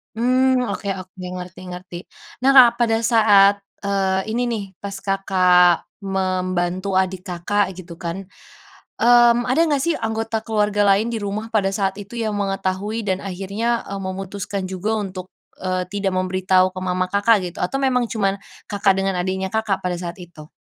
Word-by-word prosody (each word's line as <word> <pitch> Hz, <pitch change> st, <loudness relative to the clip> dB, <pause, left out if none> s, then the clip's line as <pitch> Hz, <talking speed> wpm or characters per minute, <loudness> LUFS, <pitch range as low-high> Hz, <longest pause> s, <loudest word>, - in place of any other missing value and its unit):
Mmm, 255 Hz, +2 st, +2 dB
oke 200 Hz, -, -5 dB
oke, 185 Hz, 0 st, -13 dB
ngerti 180 Hz, 0 st, -7 dB
ngerti. 180 Hz, 0 st, -8 dB, 0.4 s
Nah, 265 Hz, +2 st, +4 dB
Kak, 250 Hz, -2 st, +10 dB
pada 225 Hz, -2 st, +2 dB
saat, 205 Hz, -3 st, +5 dB, 0.2 s
eee, 195 Hz, +1 st, 0 dB
ini 240 Hz, -, -1 dB
nih 225 Hz, -4 st, -2 dB, 0.2 s
pas 200 Hz, -1 st, -6 dB
Kakak 185 Hz, -3 st, +3 dB, 0.2 s
membantu 185 Hz, -1 st, -1 dB
adik 190 Hz, 0 st, +1 dB
Kakak 185 Hz, +2 st, -1 dB
gitu 170 Hz, -2 st, -11 dB
kan, 175 Hz, +2 st, -4 dB, 0.8 s
mmm, 240 Hz, 0 st, +6 dB
ada 255 Hz, +6 st, +1 dB
nggak 290 Hz, -4 st, +1 dB
sih 335 Hz, +2 st, +1 dB
anggota 225 Hz, 0 st, -2 dB
keluarga 210 Hz, -2 st, +1 dB
lain 200 Hz, +4 st, +3 dB
di 230 Hz, -, -2 dB
rumah 210 Hz, +2 st, -4 dB
pada 195 Hz, -3 st, +1 dB
saat 195 Hz, -1 st, -1 dB
itu 205 Hz, +3 st, -9 dB
yang 220 Hz, -3 st, -2 dB
mengetahui 195 Hz, +2 st, -2 dB
dan 190 Hz, -3 st, -1 dB
akhirnya, 200 Hz, +5 st, -2 dB
eee, 200 Hz, -, -4 dB
memutuskan 195 Hz, +1 st, -5 dB
juga 195 Hz, +4 st, -2 dB
untuk, 185 Hz, -2 st, -6 dB, 0.3 s
eee, 185 Hz, -1 st, -1 dB
tidak 195 Hz, -1 st, -1 dB
memberitahu 185 Hz, 0 st, +2 dB
ke 185 Hz, -, -9 dB
mama 185 Hz, 0 st, -1 dB
Kakak, 205 Hz, +1 st, +3 dB
gitu? 180 Hz, -, -14 dB
Atau 270 Hz, 0 st, -2 dB
memang 250 Hz, -3 st, +2 dB
cuma 200 Hz, -4 st, -1 dB, 0.3 s
Kakak 200 Hz, -1 st, +2 dB
dengan 195 Hz, -2 st, -1 dB
adiknya 190 Hz, +1 st, -2 dB
Kakak, 220 Hz, -2 st, -1 dB
pada 180 Hz, -1 st, -2 dB
saat 175 Hz, -1 st, -5 dB
itu? 165 Hz, -3 st, -12 dB
195 Hz, 165 wpm, -21 LUFS, 185-220 Hz, 0.8 s, Kak